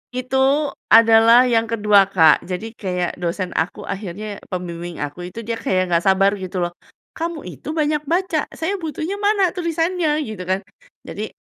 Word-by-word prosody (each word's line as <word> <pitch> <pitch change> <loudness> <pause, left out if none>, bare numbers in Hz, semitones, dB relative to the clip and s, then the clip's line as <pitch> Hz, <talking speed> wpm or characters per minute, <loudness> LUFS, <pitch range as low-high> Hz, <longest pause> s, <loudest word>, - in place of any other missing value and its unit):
Itu 265 +3 +1 0.2
adalah 230 +2 +7
yang 230 -2 +2
ke-2 210 -3 +4
Kak. 165 -5 +5
Jadi 190 +5 -5
kayak 180 -5 -3
dosen 180 +1 -3
aku 160 - -2
akhirnya 200 +1 -6
pembimbing 175 -1 -5
aku 160 +5 -6
itu 230 +5 -8
dia 230 +1 -4
kayak 185 -3 0
nggak 170 0 +2
sabar 195 +1 +4
gitu 185 -1 -3
loh, 175 - -2 0.4
"Kamu 330 -1 -4
itu 305 - -7
banyak 300 -1 +1
baca, 340 -1 0
saya 380 +4 -2
butuhnya 325 +5 -4
mana 405 -3 +2
tulisannya?" 330 -3 -1
Gitu 215 -6 -7
kan. 190 +1 +1 0.4
Jadi, 215 +2 -6
225 Hz, 160 wpm, -20 LUFS, 185-305 Hz, 0.4 s, adalah